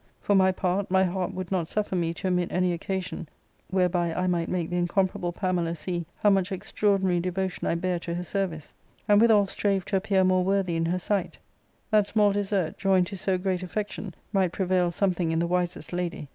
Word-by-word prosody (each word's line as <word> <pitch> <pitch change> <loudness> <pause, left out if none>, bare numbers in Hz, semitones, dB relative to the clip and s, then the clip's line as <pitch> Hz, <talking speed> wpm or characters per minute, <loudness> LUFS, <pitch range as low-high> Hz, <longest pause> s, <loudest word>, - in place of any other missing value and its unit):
For 205 - 0
my 190 -1 +5
part, 185 +1 -1
my 190 0 +4
.heart 185 0 -1
would 185 -1 -5
not 180 -4 0
suffer 205 0 -2
me 170 -2 0
to 190 - -3
omit 180 -1 0
any 180 -1 +1
occasion 185 -2 -4 0.4
whereby 180 -2 +1
I 180 +3 -1
might 175 -2 0
make 175 -2 -2
the 175 - 0
incomparable 175 0 0
Pamela 175 -2 -1
see 170 0 -4
how 205 - +4
much 195 0 +1
extraordinary 190 -2 +1
devo 185 +1 -1
tion - - -5
I - - +1
bare 180 0 -1
to 170 0 -4
her 175 - -3
service; 180 -5 -3 0.3
and 205 0 +5
withal 220 -3 +5
strave 195 -1 -1
to 195 - 0
appear 190 -1 +2
more 185 0 +3
worthy 190 -2 +1
in 165 0 0
her 180 +2 0
sight; 195 +2 -2 0.5
that 210 -2 +4
small 210 -1 +3
desert, 200 -4 -1
joined 190 -2 +3
to 195 - -7
so 190 0 0
great 185 -1 -1
affection, 200 0 -5 0.2
might 190 -3 +2
prevail 180 -2 +1
something 175 -2 0
in 165 - 0
the 170 - +1
wisest 175 -1 -2
lady. 175 -5 -3
185 Hz, 205 wpm, -26 LUFS, 175-195 Hz, 0.5 s, my